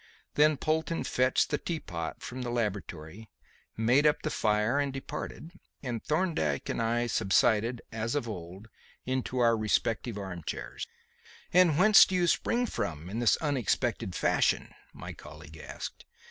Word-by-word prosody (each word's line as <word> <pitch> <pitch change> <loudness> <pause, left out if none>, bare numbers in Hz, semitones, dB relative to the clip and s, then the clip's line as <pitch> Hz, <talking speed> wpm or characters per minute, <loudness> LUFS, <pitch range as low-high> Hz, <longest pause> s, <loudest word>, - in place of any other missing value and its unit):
Then 150 0 +4
Polton 160 +3 -1
fetched 130 0 +1
the 150 - 0
tea 165 -2 -3
pot 85 - -6
from 130 +1 -6
the 120 - -3
laboratory, 105 -4 -4 0.5
made 125 +7 +4
up 150 - +1
the 155 - -1
fire 105 +5 +1
and 140 -1 0
departed, 135 +4 -6 0.3
and 120 -4 -4
Thorndyke 155 - 0
and - - -1
I 120 +1 +1
subsided, 115 +2 +2
as 115 +3 -2
of 145 -5 -1
old, 95 0 -8 0.4
into 130 0 -2
our 115 -2 +4
respective 110 +1 0
arm 95 -3 -6
chairs. - - -5 0.7
"And 175 -4 +5
whence 210 +3 +8
do 190 - -2
you 180 -1 +3
spring 235 +7 +1
from 85 - -4
in 110 - -3
this 120 -2 +4
unexpected 130 - -1
fashion?" - - +1 0.2
my - - -8
colleague 80 0 -12
asked. - - -8
120 Hz, 150 wpm, -29 LUFS, 105-145 Hz, 0.7 s, whence